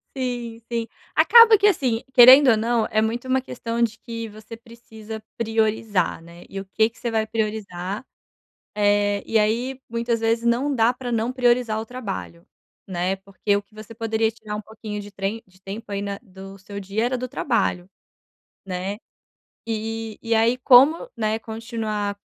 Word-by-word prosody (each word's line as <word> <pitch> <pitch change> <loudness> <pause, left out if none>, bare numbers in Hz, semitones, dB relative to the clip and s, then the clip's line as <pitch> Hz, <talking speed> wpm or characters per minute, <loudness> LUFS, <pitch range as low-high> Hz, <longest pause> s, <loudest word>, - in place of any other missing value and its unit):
Sim, 240 -3 -4
sim. 230 -1 -1 0.3
Acaba 460 -2 +8
que, 405 - +1
assim, 260 - +2
querendo 255 +2 +9
ou 220 - +3
não, 230 0 +1
é 215 - +2
muito 235 +3 -2
uma 260 0 +2
questão 235 -2 -4
de 225 -2 +1
que 230 -1 -7
você 215 +2 -11
precisa 225 -2 -11
priorizar, 220 -5 0
né? 170 +1 -14
E 195 - -6
o 195 - -7
que 220 +3 +2
que - - -21
você 235 - -2
vai 220 -1 0
priorizar? 210 -2 -4 0.7
Eh, 205 -1 +2
e 225 - +1
aí, 240 +5 0
muitas 230 0 -1
vezes, 230 +1 +1
não 250 +5 +1
dá 235 -1 +3
pra 245 0 -6
não 230 +2 -1
priorizar 240 -3 +2
o - - -7
trabalho, 205 -8 -7 0.4
né? 185 +1 -1
Porque 195 +1 -1
o - - -3
que 200 +1 -27
você 215 +1 -10
poderia 225 0 0
tirar 215 -2 -7
um 210 - -4
pouquinho 215 -1 -7
de 205 - -11
trem 200 +3 -4
de 185 0 -25
tempo 205 +3 -8
aí 200 0 -2
na 200 0 -4
do 195 -1 -12
seu 200 +1 -8
dia 200 +3 -2
era 250 +2 0
do 255 +1 -4
trabalho, 210 -8 -1 0.8
né? 190 +2 -4 0.7
E 225 -1 -4
e 230 -1 -1
aí, 230 +3 +3
como, 275 - +6
né, 220 0 0
continuar 220 -3 -4
225 Hz, 175 wpm, -23 LUFS, 205-235 Hz, 0.8 s, querendo